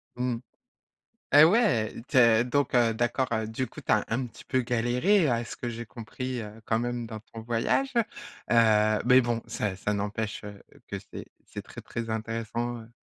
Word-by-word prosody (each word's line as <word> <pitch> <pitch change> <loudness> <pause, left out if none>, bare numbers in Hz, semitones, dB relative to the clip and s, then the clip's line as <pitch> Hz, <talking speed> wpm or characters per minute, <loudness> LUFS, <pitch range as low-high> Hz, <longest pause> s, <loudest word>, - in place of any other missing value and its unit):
Mmh 125 -2 -1 0.9
et 145 +2 +9
ouais! 170 - +3
Tu 140 - 0
as 115 -1 +6
donc 135 +3 0
heu, 120 -2 +4
d'accord, 120 +3 0
heu, 110 -1 0
du 120 +4 -3
coup - - -11
tu - - -2
as - - +4
un 125 +3 -1
petit 120 - -12
peu 130 -2 +1
galéré 125 - +2
à 120 -1 0
ce - - -7
que 120 -3 -4
j'ai 115 0 -6
compris, 125 +3 -6
heu, 105 -1 -7
quand 110 0 +1
même 120 -1 -2
dans 110 -1 -7
ton 115 +1 -11
voyage. 120 - 0 0.6
Heu, 110 -2 +4
mais 130 +1 +7
bon, 120 -1 -1
ça 100 -3 -3
ça 105 +2 -2
n'empêche, 105 +1 -3
heu, 100 -1 -9 0.3
que - - -4
c'est - - -7 0.2
c'est - - -7
très - - -11
très 115 -1 -5
intéressant, 115 +2 -3
heu, 115 - -15
120 Hz, 195 wpm, -27 LUFS, 110-125 Hz, 0.9 s, et